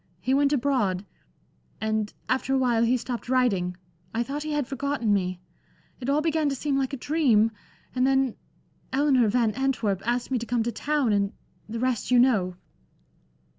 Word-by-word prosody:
He 255 +8 0
went 280 +1 +3
abroad. 240 -9 +1 0.7
And 220 -1 -1 0.2
after 265 +1 0
a - - +3
while 240 -3 +2
he 240 +2 +3
stopped 245 -1 -5
writing, 195 -9 +1 0.4
I 235 - +1
thought 280 +4 -4
he 310 +1 -4
had 295 -2 0
forgotten 270 -4 -1
me. 185 -2 -1 0.6
It 255 - -4
all 290 +2 +3
began 315 -2 +1
to 275 - -2
seem 280 +1 -1
like 270 -1 0
a 275 - -4
dream. 245 -7 +3 0.4
And 255 0 +2
then 270 -3 +2 0.6
Eleanor 265 -3 +3
Van 225 0 +2
Antwerp 230 -6 0
asked 240 +2 -1
me 255 - +1
to 235 - -5
come 240 -2 +1
to 235 - -1
town, 285 -4 0
and 200 -1 +1 0.4
the 230 - -4
rest 250 -2 -1
you 250 - +5
know." 215 -8 +3
250 Hz, 175 wpm, -26 LUFS, 220-275 Hz, 0.7 s, you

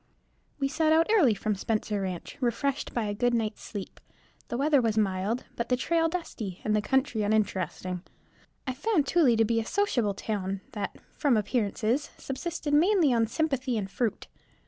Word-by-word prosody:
_ - - -40 0.6
We 275 - +1
set 315 +2 +1
out 325 +1 +5
early 305 - +5
from 215 +1 -1
Spencer 210 0 -1
ranch, 185 -3 -5
refreshed 255 +3 -1
by 235 - -1
a 205 -1 -2
good 245 +3 +1
night's 220 -2 -2
sleep. 200 -4 -7 0.5
The 240 - -3
weather 285 0 +4
was 225 -2 0
mild, 200 +3 0
but 235 0 -3
the 250 - +4
trail 330 +5 +1
dusty, 230 - -5
and 215 - +1
the 210 - +2
country 265 -1 +1
uninteresting. 190 -4 -1 0.6
I 260 - -2
found 305 - +1
Tooele 275 -7 +4
to 225 - +4
be 230 +1 +1
a - - -1
sociable 245 - +1
town 195 -2 -3
that, 210 -4 -4 0.2
from 275 -6 +3
appearances, 220 +4 0
subsisted 300 +2 -4
mainly 330 -2 +4
on 225 -1 +2
sympathy 260 -2 0
and 195 -2 -3
fruit. 235 -1 -1
235 Hz, 175 wpm, -28 LUFS, 210-285 Hz, 0.6 s, out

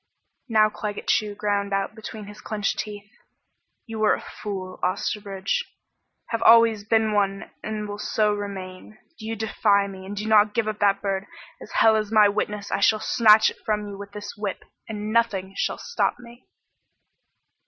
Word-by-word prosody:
Now 215 -1 +5
Claggett 210 -1 -5
Chew 210 -1 +1
ground 200 -1 -1
out 195 +1 -1
between 220 -1 -8
his 210 +1 -12
clenched 210 -2 -2
teeth: 205 -1 -6 0.8
"You 225 -2 -4
are - - +4
a - - -7 0.2
fool, 185 -3 -5
Osterbridge. 200 - -1 0.7
Have 230 -1 -2
always 230 -2 +6
been 220 0 +2
one 195 -1 0
and 215 -1 -4
will 205 0 -6
so 210 0 +1
remain. 200 0 -7 0.2
Do 220 - -7
you 225 - -2
defy 210 -2 +2
me 190 -1 -9
and 205 +1 -6
do 210 - -3
not 210 -1 +4
give 230 -2 +1
up 215 -1 -3
that 200 0 +2
bird, 195 0 -2 0.3
as - - -11
hell 220 -1 +5
is 215 -1 -1
my 215 -2 +6
witness 205 0 -3
I - - 0
shall 215 +2 +4
snatch 220 -1 +5
it - - -15
from 210 -1 -1
you 200 - -7
with 200 0 -9
this 205 0 -7
whip, 205 -2 -4 0.3
and 215 0 -4
nothing 195 -5 +1
shall - - -1
stop 475 - -1
me!" 240 0 -15
210 Hz, 175 wpm, -24 LUFS, 200-220 Hz, 0.8 s, always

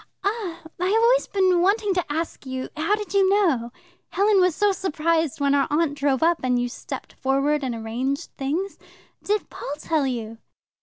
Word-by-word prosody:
"Ah, 400 -4 -2 0.2
I 365 - +1
have 445 +3 +3
always - - +4
been 370 -3 +2
wanting 400 +2 +2
to 355 -4 -2
ask 320 -2 -4
you. 260 0 -4
How 325 +7 +1
did 420 -2 -7
you 390 -1 +4
know? 325 - +2 0.4
Helen 400 0 +3
was 365 -3 +3
so 415 -1 +3
surprised 325 -4 0
when 280 0 +2
our 280 - +3
aunt 300 0 +1
drove 280 -1 0
up, 335 0 +3
and 250 -1 +1
you 245 0 -1
stepped - - -8
forward 275 +2 0
and 250 -3 -2
arranged 240 +5 -3
things. 320 +9 -3 0.4
Did 420 +1 -1
Paul 280 - -5
tell 305 -2 0
you?" 230 -3 -4
320 Hz, 185 wpm, -24 LUFS, 270-390 Hz, 0.4 s, always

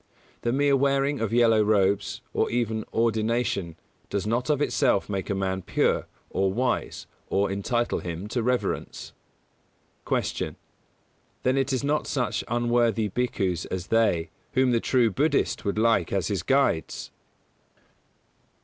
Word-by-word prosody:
The 120 - 0
mere 140 +2 +3
wearing 140 +1 +1
of 115 -2 -1
yellow 115 -2 +4
robes, 100 -1 +1
or - - +1
even 110 -2 -1
ordination, 110 -5 0 0.3
does 100 -1 -2
not 120 +5 -1
of 150 -2 +2
itself 140 -7 +2
make 95 -2 -3
a 100 - 0
man 95 -1 -1
pure - - 0 0.2
or 95 0 +1
wise 125 +4 -1 0.2
or 100 0 +1
entitle 120 +5 -1
him 85 +3 -5
to 120 +2 -1
reverence. 125 +2 -2 0.9
152. - - 0
Q. - - -9 0.9
_Then 130 +1 +2
it 135 0 +1
is 130 0 -1
not 150 +2 0
such 125 -5 -1
unworthy 120 -2 +1
bhikkhus 95 -6 -1
as 95 -1 -4
they, 90 -8 +2 0.2
whom 130 -1 +3
the 115 - +3
true 120 -2 +2
Buddhist 145 +3 0
would 100 +1 -1
lake 110 -5 +2
as 100 0 0
his 100 -5 -1
guides? 135 -7 0
115 Hz, 140 wpm, -26 LUFS, 100-125 Hz, 0.9 s, yellow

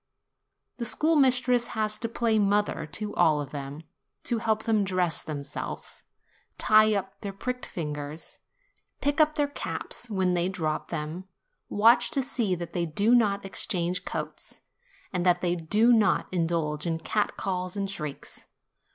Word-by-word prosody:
The 235 - -3
schoolmistress 255 -4 +3
has 215 0 0
to 230 - -3
play 230 -1 +1
mother 205 -4 +1
to 210 -1 -4
all 160 -4 +3
of 145 -1 -5
them, 145 +2 -6 0.4
to 235 -2 -1
help 220 -1 0
them 220 -3 +2
dress 180 -5 0
themselves, 145 -2 -6 0.5
tie 215 0 +5
up 195 -1 -4
their 200 - -4
pricked 250 +6 -4
fingers, 150 -1 -6 0.6
pick 290 +3 +2
up 305 0 +3
their 290 -1 +2
caps 265 -3 -4
when 190 -3 +1
they 175 +1 +1
drop 160 -5 -2
them, 165 +3 -4 0.4
watch 235 +3 +5
to 270 - +2
see 235 -8 0
that 170 -1 -7
they 170 -1 0
do 205 +9 +2
not 205 -5 +3
exchange 180 -2 0
coats, - - -6 0.5
and 180 -2 0
that 180 -1 +3
they 175 -1 +1
do 210 +8 +3
not 220 -3 +3
indulge 165 -3 -1
in 165 -1 0
cat 210 +5 -1
calls 185 0 -3
and 195 -1 -2
shrieks. 150 -7 -7
195 Hz, 150 wpm, -27 LUFS, 170-225 Hz, 0.6 s, tie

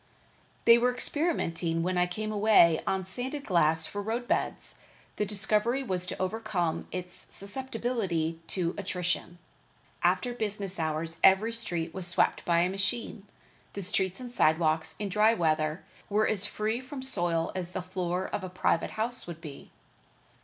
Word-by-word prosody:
They 235 0 +8
were 250 +1 +3
experimenting 175 - 0
when 185 +1 0
I 180 0 +3
came 215 +4 -4
away 205 -6 +5
on 190 -1 0
sanded 260 +9 -5
glass 160 -3 +3
for 205 - -3
road 230 +4 -3
beds. - - -1 0.4
The 210 - 0
difficulty 215 +5 +1
was 185 -6 0
to - - -5
overcome 185 -4 -1
its 180 0 -5
susceptibility 200 -7 -2
to 175 -1 0
attrition. 180 -2 -3 0.6
After 245 -1 +2
business 205 -5 -2
hours 160 +1 -2
every 200 +4 +5
street 170 -8 -3
was 185 -2 -3
swept 180 - +2
by 170 -1 +3
a 180 - +2
machine. 205 +1 -2 0.5
The 200 - -5
streets 190 -1 -1
and 250 -1 -7
sidewalks, 160 -5 +2
in 205 - -3
dry 215 +3 +4
weather, 155 -1 0 0.3
were 215 +1 +3
as 205 -1 +2
free 220 +4 -2
from 260 0 -7
soil 175 -9 0
as 180 -1 -4
the 185 - -3
floor 180 0 -2
of 205 - -4
a 185 - -4
private 180 -2 0
house 235 +1 -1
would 170 -2 -7
be. 150 -4 -10
190 Hz, 155 wpm, -29 LUFS, 170-220 Hz, 0.6 s, They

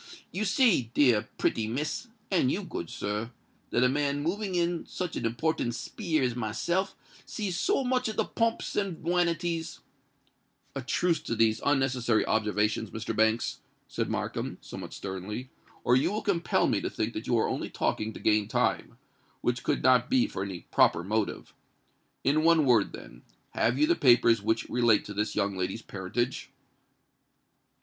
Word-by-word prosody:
You 200 +5 -2
see, 200 - +3
dear 120 -5 +4
pretty 110 -1 0
Miss—and 160 - -2
you, 205 - -2
good 85 - -6
sir,—that 115 +3 -4
a - - +6
man 145 +1 0
moving 190 +3 -2
in 175 -1 0
such 180 -3 -4
a - - -3
important 120 +1 -1
speer 160 - -2
as 125 -2 0
myself 170 - -1 0.3
sees 195 -4 -3
so 360 - +1
much 255 -1 +1
of 215 - -5
the - - +1
pomps 230 0 -1
and 195 -6 -2
wanities——" 170 -1 0 1.0
"A 135 - -2
truce 170 +6 +1
to 115 - -3
these 110 -1 +2
unnecessary 130 -5 +2
observations, 105 0 0
Mr. 110 +1 -4
Banks," 110 +1 +1 0.3
said - - -3
Markham, - - -3
somewhat - - -8
sternly; 100 +6 -6 0.3
"or 125 - +4
you 130 - +2
will 215 +1 -3
compel 175 -5 +1
me - - +1
to - - -2
think 110 +2 -3
that 110 - -6
you 120 - +2
are 110 - +2
only - - -3
talking 110 +1 -1
to - - -10
gain 105 -1 +2
time—which 120 0 -3
could - - -1
not 130 0 +4
be 255 -1 +4
for 95 - -5
any 95 -3 -5
proper 85 - +4
motive. 105 +2 -2 0.7
In 145 +3 +3
one 165 -2 +5
word, 120 -6 +3
then—have 115 - -4
you 150 - +4
the 170 - +3
papers 120 -5 +5
which 110 +2 0
relate 120 -3 +3
to 105 - -7
this 105 +1 -2
young 100 -2 0
lady's 95 +5 -3
parentage?" 100 +5 -3
125 Hz, 160 wpm, -28 LUFS, 110-170 Hz, 1.0 s, a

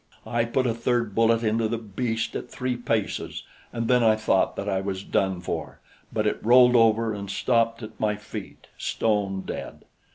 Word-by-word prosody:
I 120 -1 0
put 130 +3 0
a 120 - +1
third 115 -2 0
bullet 115 +1 +3
into 110 0 +1
the 115 +1 -2
beast 115 +1 -3
at - - -5
three 125 0 -2
paces, 115 -4 -2 0.3
and 115 -1 -2
then 125 0 +4
I 110 -1 +5
thought 110 0 +1
that - - -4
I 95 0 0
was 95 -1 -4
done 95 -3 0
for; 85 - -5 0.3
but 110 -1 -1
it 105 - -1
rolled 125 +1 +6
over 115 -1 +4
and 100 -1 -6
stopped 115 +1 +1
at 110 - -10
my 105 -1 +1
feet, 105 - -9
stone 100 -3 0
dead. - - -7
115 Hz, 185 wpm, -25 LUFS, 105-115 Hz, 0.3 s, rolled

